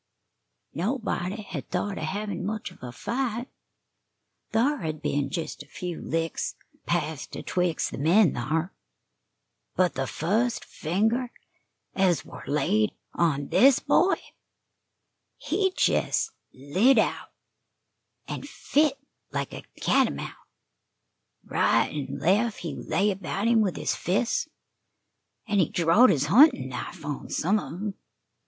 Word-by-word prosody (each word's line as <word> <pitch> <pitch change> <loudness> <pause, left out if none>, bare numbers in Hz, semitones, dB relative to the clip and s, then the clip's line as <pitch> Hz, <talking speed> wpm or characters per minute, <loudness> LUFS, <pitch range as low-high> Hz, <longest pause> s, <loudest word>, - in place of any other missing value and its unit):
Nobody 210 -1 -2
hed 175 -8 -7
thought 195 +2 -2
of - - -2
hevin' 200 +1 -3
much 210 -1 -3
of - - -18
a 125 -1 -6
fight 240 - -2 1.0
thar 260 +6 +2
hed 155 -4 -3
been 145 -1 -1
jes' 160 -4 -4
a 145 - -12
few 175 +2 -6
licks 165 0 -2 0.3
passed - - -2
atwixt 180 -3 -1
the - - -6
men 170 +4 +4
thar; 155 +9 -1 1.0
but 180 -1 +3
the 135 0 -2
fust 225 +9 0
finger 220 +9 0 0.6
ez 185 -4 +2
war - - -10
laid 135 -7 +1 0.2
on 145 -5 +1
this 270 0 +6
boy, 370 +3 +3 1.2
he 385 -2 0
jes' - - +1 0.2
lit 185 - +3
out, - - +1 1.0
an' - - -4
fit 290 -1 +1 0.3
like - - -3
a - - -6 0.2
catamount. - - +1 1.1
Right - - +2
an' 140 -2 -4
lef' 205 - +2
he 170 -3 -5
lay 205 +2 0
about 195 +2 -2
him 230 -1 +5
with 195 -4 0
his - - -1
fists, 220 - 0 1.0
an' 205 -2 +2
he 170 - +3
drawed 175 +9 +5
his 145 -7 +2
huntin' 200 - +6
knife 125 +2 -6
on 145 -2 -5
some 200 +6 +1
of - - -6
'em. 200 +4 -4
185 Hz, 125 wpm, -26 LUFS, 155-220 Hz, 1.2 s, this